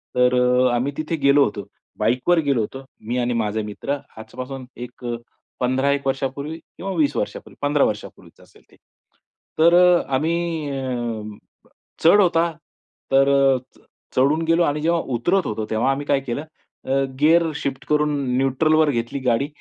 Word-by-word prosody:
तर 125 0 +3
अ, 125 0 +3
आम्ही 135 +4 -1
तिथे 155 +1 -2
गेलो 140 +1 +6
होतो. 100 -1 -5 0.3
बाईकवर 125 +11 +2
गेलो 135 -5 +2
होतो. 135 +5 -6 0.2
मी 120 +2 -1
आणि 120 0 0
माझा 105 +1 -2
मित्र. 120 +7 -4 0.2
आजपासून 130 +4 -8 0.2
एक 125 0 -15 0.5
15 130 +2 +1
एक 140 -1 -1
वर्षापूर्वी 135 +3 -3 0.2
किंवा 195 +2 -5
20 155 -4 +1
वर्षांपूर्वी, - - -4
15 145 0 +2
वर्षांपूर्वीच 105 -1 -6
असेल - - -21
ते. - - -20 0.8
तर 170 +2 +6 0.4
आम्ही 160 +2 -1
अ, 120 -4 -3 0.8
चढ 170 +6 +7
होता. 170 -2 +2 0.6
तर 135 0 +5
अ, 135 -1 +4 0.2
च - - -23 0.4
चढून 140 +5 +3
गेलो 165 +1 +3
आणि 150 -1 0
जेव्हा 170 +1 +1
उतरत 175 +10 +1
होतो. 110 0 -3
तेव्हा 115 +5 +2
आम्ही 140 +1 -3
काय 140 - +2
केलं, 135 +2 -4 0.4
अ, 135 +1 +1 0.2
गिअर 165 +3 +5
शिफ्ट 135 -2 -4
करून 150 0 +2 0.2
न्यूट्रलवर 155 +4 +2
घेतली 120 +2 -3
गाडी 125 +3 +2
135 Hz, 155 wpm, -22 LUFS, 125-155 Hz, 0.8 s, चढ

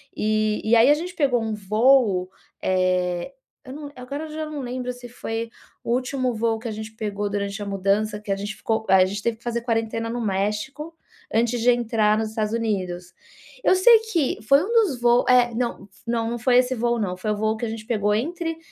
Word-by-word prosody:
E 215 0 0
e 220 +2 +3
aí, 235 +4 +6
a - - +8
gente 350 +4 -5
pegou 270 -7 +2
um 220 -1 -2
voo, 210 -2 +3 0.3
eh, 185 +3 0 0.3
eu 260 - -8
n 290 0 -8
agora 275 +5 -6
eu - - -9
já 310 0 -4
não 305 -2 -5
lembro, 250 0 -4
se 245 0 -11
foi 230 -1 -4 0.3
o - - -3
último 255 0 -1
voo 225 0 0
que 235 - -7
a - - -4
gente 220 +1 -7
pegou 205 -1 -3
durante 200 0 -3
a - - -4
mudança, 200 +2 0
que 210 -1 -6
a - - +2
gente 205 +2 -5
ficou 220 -1 -2
a 190 -1 +7
gente 200 +2 -4
teve 230 -1 -1
que 230 - -27
fazer 235 -1 -2
quarentena 225 -1 -1
no 240 +1 -3
México, 210 +10 -2 0.4
antes 235 +2 +1
de 240 - +4
entrar 225 -3 +2
nos 220 0 -1
Estados 215 0 -2
Unidos. 185 -6 -2 0.5
Eu - - +5
sei 450 +5 +7
que 305 - +1
foi 275 +7 +4
um 410 - -4
dos 405 - +2
voos 240 0 +4
é, 245 -1 +5
não 235 -3 -3 0.2
não 230 -1 0
não 240 - -3
foi 245 +1 +3
esse 255 0 +1
voo, 240 0 0
não, 185 -4 -2
foi 210 +4 -2
o - - 0
voo 220 +1 0
que 235 - -3
a - - -3
gente 220 -1 -6
pegou 210 -3 +1
entre, 330 - -2
225 Hz, 220 wpm, -23 LUFS, 210-250 Hz, 0.5 s, a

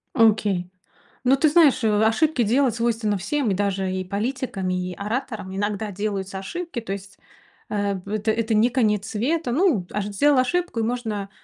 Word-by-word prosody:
Окей. 210 -6 +3 0.5
Ну, 260 +1 +5
ты 305 +3 +3
знаешь, 300 -5 +5
э, - - +3 0.2
ошибки 245 +4 +2
делать 245 +2 +2
свойственно 230 -3 0
всем: 230 +5 -1
и - - +2
даже 195 -1 -1
и 185 0 -2
политикам, 205 0 -3
и 180 0 -2
ораторам 210 -2 -4
иногда 205 +1 -2
делаются 195 -1 -3
ошибки. 335 - -5
То 225 -4 -5
есть, 195 0 -9 0.5
э, 200 -1 -1
п 195 +3 -5
это 215 +1 0
это 225 0 -1
не 220 +3 +4
конец 215 -5 +1
света. 250 +7 -1
Ну, 280 - +2
ош 210 -1 -2
сделал 270 +8 +2
ошибку 345 0 0
и - - +1
можно 220 -4 -3
215 Hz, 175 wpm, -23 LUFS, 200-255 Hz, 0.5 s, Ну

